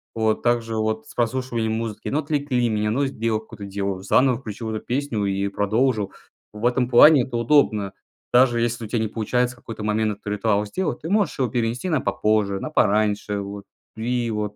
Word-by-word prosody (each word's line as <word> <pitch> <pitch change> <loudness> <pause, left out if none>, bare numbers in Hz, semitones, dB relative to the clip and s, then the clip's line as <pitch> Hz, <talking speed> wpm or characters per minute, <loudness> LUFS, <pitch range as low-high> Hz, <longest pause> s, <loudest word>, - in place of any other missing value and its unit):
Вот. 110 -1 +1
Так 120 -1 +2
же 115 -1 -5
вот 110 0 -1
с - - -13
прослушиванием 120 -2 -1
музыки: 110 -2 -4
ну, 150 - 0
отвлекли 140 -5 0
меня, 105 0 0
ну, 135 +6 +1
сделал 115 -4 -1
какое-то 110 -2 -10
дело- 100 -1 -3
заново 125 +4 +3
включил 110 -2 -6
эту 110 - -5
песню 125 -5 -1
и 100 0 -1
продолжил. 110 0 0 0.4
В 105 +2 -5
этом 125 0 +2
плане 130 +2 +7
это 125 -1 -6
удобно. 115 -5 +2 0.4
Даже 120 -1 +4
если 115 -1 -1
у - - -7
тя 115 +1 -1
не 110 -1 -1
получается 125 +3 -1
в - - -18
какой-то 110 -2 -8
момент 110 0 0
этот 100 - -14
ритуал 105 0 +1
сделать, 155 - -3
ты 165 - -5
можешь 205 -5 +1
его 125 -3 +1
перенести 120 - -1
на 155 -5 +2
попозже, 105 -4 0
на - - -4
пораньше, 105 -4 +1
вот. 100 0 -7 0.3
Ви 115 +3 -2
его 105 -2 -3
115 Hz, 200 wpm, -23 LUFS, 105-125 Hz, 0.4 s, плане